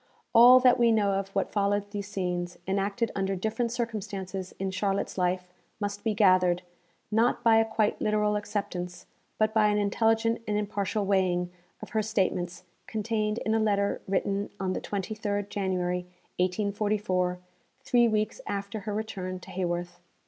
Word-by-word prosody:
All 245 +2 +9
that 250 -1 +5
we 235 -1 +5
know 210 -3 +3
of 195 0 -1
what 195 - 0
followed 205 0 0
these 200 -1 -4
scenes, 180 -3 -3
enacted 200 +4 0
under 195 0 -1
different 220 +5 -1
circumstances, 195 -5 -4
in 190 0 -2
Charlotte's 195 +1 -1
life, 180 0 -1 0.3
must 205 -1 -3
be 220 -2 0
gathered, 185 -3 +4 0.5
not 230 +3 +2
by 225 -1 +6
a 225 - +4
quite 220 -1 0
literal 210 0 +2
acceptance, 180 -4 -4 0.3
but 215 0 +2
by 215 -1 +4
an 210 0 +2
intelligent 225 +3 +2
and 210 0 0
impartial 205 -1 -1
weighing, 180 -2 +1 0.3
of - - -8
her 220 - +1
statements, 185 -4 -1 0.2
contained 215 0 -1
in 220 - +1
a 225 - +3
letter 200 -2 +1
written 195 +1 0
on 185 -1 -1
the - - -3
23rd 205 0 -3
January 180 -2 -1 0.3
1844, 190 -1 0 0.5
three 240 -2 +4
weeks 215 -1 -1
after 200 +1 -3
her 205 +1 -4
return 190 -4 -4
to 190 - -12
Haworth. 175 -1 -3
200 Hz, 155 wpm, -28 LUFS, 185-215 Hz, 0.5 s, All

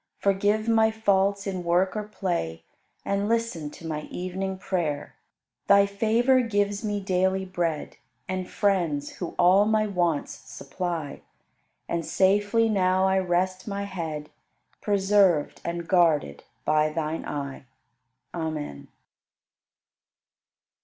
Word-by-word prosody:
Forgive 205 +2 +1
my 225 -1 +4
faults 200 -2 +1
in 185 -3 -3
work 180 +3 +2
or 215 - -1
play 175 - -3 0.4
And 200 +1 0
listen 230 -10 -1
to 165 - -12
my 155 -1 -3
evening 190 +1 -4
prayer. 170 -6 -2 0.5
Thy 200 0 +6
favor 225 +6 +2
gives 205 -2 0
me 205 -1 -1
daily 190 0 0
bread 170 -4 -3 0.3
And 185 -1 -3
friends, 170 -8 0
who 175 - -5
all 185 +3 +5
my 215 0 +2
wants 175 -7 0
supply: 165 0 -5 0.7
And 170 -1 -2
safely 205 +6 +2
now 190 -3 +2
I 190 0 +3
rest 185 +1 -1
my 200 -1 -3
head, 160 -6 -5 0.5
Preserved 195 -6 +2
and 170 0 -4
guarded 160 - +2 0.2
by 155 0 +3
Thine 155 0 -3
eye. 140 -2 -5 0.7
Amen. 155 - -4
185 Hz, 115 wpm, -26 LUFS, 165-200 Hz, 0.7 s, Thy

